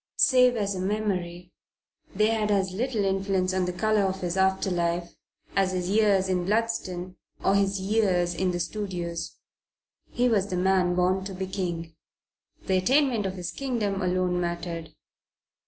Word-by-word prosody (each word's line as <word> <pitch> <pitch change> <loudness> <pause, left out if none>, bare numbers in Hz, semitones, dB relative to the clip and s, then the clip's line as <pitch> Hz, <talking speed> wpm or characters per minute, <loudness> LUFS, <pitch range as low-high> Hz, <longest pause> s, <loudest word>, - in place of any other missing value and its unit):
Save 250 -2 +5
as 200 -3 -1
a 185 - -4
memory 185 -3 -2 0.6
they 215 +2 +3
had 215 -2 0
as 195 -2 +1
little 220 +1 -1
influence 190 -1 0
on 185 -1 +1
the 180 - -1
colour 215 +3 +1
of 190 -1 -1
his 175 -1 -2
after 190 0 +2
life 170 0 -1 0.4
as 190 -1 +2
his 180 0 -2
years 205 -3 +3
at 185 -1 +1
Bludston 185 -2 -2 0.3
or 195 - +4
his 200 0 +2
years 190 -3 +1
in 185 +2 0
the 175 -1 -2
studios. 175 -3 -4 0.7
He 245 +1 +1
was 205 -5 +2
the 185 - -3
man 180 -1 +2
born 185 +1 +2
to 195 -1 -6
be 190 +1 -3
king. 175 -4 -4 0.7
The 190 - +2
attainment 245 +1 +2
of 190 - -5
his 180 -1 -5
kingdom 220 -8 -2
alone 180 -1 0
mattered. 170 -2 -4
190 Hz, 160 wpm, -26 LUFS, 180-205 Hz, 0.7 s, Save